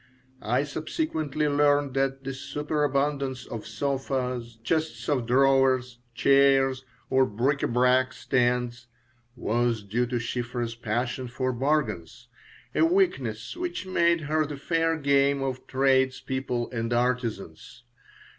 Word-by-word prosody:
I 125 +5 +1
subsequently 155 - -2
learned 145 -1 +2
that 135 0 -1
the 135 0 -4
superabundance 140 -1 -1
of 115 -2 -7
sofas, 125 -1 -3
chests 160 +5 -1
of 130 -5 0
drawers, 130 -1 +3 0.2
chairs, 135 -1 +4 0.3
or 130 0 +5
bric 130 +7 0
à - - -1
brac 125 +1 +3
stands 120 -2 -1 0.5
was 120 -1 0
due 120 +5 -1
to 125 - -3
Shiphrah's 120 0 -3
passion 120 +3 -3
for 130 +2 -2
bargains, 120 - -2 0.4
a - - +3
weakness 140 - +1
which 350 - -4
made 170 -2 +2
her 155 +1 +1
the 145 -1 -6
fair 165 +3 0
game 140 -1 +2
of 130 -1 -4
tradespeople 130 -2 0
and 115 -1 -3
artisans. 120 -5 -2
130 Hz, 120 wpm, -26 LUFS, 120-145 Hz, 0.5 s, or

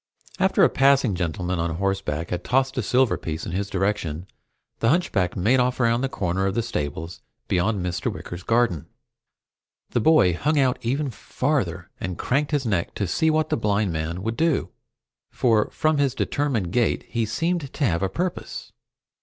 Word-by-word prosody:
After - - +3
a - - +6
passing 135 -5 +3
gentleman 90 0 -2
on 85 -1 -1
horseback 95 -4 -2
had 90 0 -2
tossed 135 +1 +1
a 130 - 0
silver 125 +3 +2
piece 80 -1 -4
in - - -5
his 100 +3 -2
direction, 95 -4 -1 0.5
the 115 - +2
hunchback 110 - +1
made 115 +8 +3
off 125 +1 +1
around 115 0 +2
the 135 - 0
corner 95 -3 -1
of 95 - -2
the 115 - +1
stables 80 -5 -4 0.3
beyond 95 +1 0
Mr. 90 -1 -1
Wicker's 90 +1 -7
garden. 115 - +1 1.0
The - - +1
boy 150 - +5
hung 150 - 0
out 130 -3 +2
even 135 +3 -1
farther - - -2
and 90 - -4
craned 140 +3 0
his 145 -3 0
neck 100 -6 -1
to 100 - -1
see 160 - +1
what 155 0 +1
the - - +1
blind 105 -4 0
man 80 +3 -3
would 115 +1 -2
do, 160 -2 +1 0.6
for 115 -4 +2
from 155 -1 +1
his 135 -2 +1
determined 130 -12 -1
gait 120 +2 +1
he 115 -1 -2
seemed 165 +5 -1
to 145 - -1
have 85 -6 +1
a 95 - +1
purpose. 180 - -4
110 Hz, 180 wpm, -24 LUFS, 90-135 Hz, 1.0 s, a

